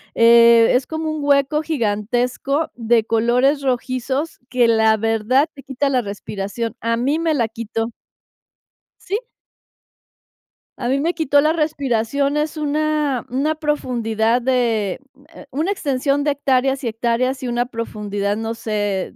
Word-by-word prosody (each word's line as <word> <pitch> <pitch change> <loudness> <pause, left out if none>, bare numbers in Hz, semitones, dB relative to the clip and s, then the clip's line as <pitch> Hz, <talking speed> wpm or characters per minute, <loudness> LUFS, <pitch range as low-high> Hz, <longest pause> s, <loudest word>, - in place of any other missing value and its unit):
eh, 230 0 +6
es 255 0 +1
como 315 0 -3
un 310 -1 -4
hueco 285 +1 +2
gigantesco 250 +2 -1
de 230 -1 +2
colores 245 +6 +2
rojizos 260 +3 -2
que 245 -1 +3
la 220 -1 +4
verdad 225 +6 +1
te 275 - -12
quita 275 +1 -1
la 255 -2 +2
respiración, 205 +2 -5
a 230 0 0
mí 275 +6 0
me 330 -1 +1
la 235 -5 +1
quitó. 225 +1 -4 1.1
Sí. 395 +2 -2 1.6
A 240 - -2
mí 275 +1 +1
me 335 +4 0
quitó 290 -3 +3
la 310 +2 +2
respiración, 280 -3 0
es 305 +1 -2
una 300 -3 0
una 280 +5 0
profundidad 240 -6 0
de, 235 -6 0 0.2
m 275 +1 -23
m - - -12
eh, - - -17
una 310 +8 -1
extensión 280 -4 0
de 295 0 +1
hectáreas 270 -1 0
y - - 0
hectáreas, 240 +4 -1
y 255 - -3
una 240 0 0
profundidad 210 -4 -3
no 225 +1 -3
sé, 205 -4 -3
255 Hz, 145 wpm, -20 LUFS, 230-285 Hz, 1.6 s, eh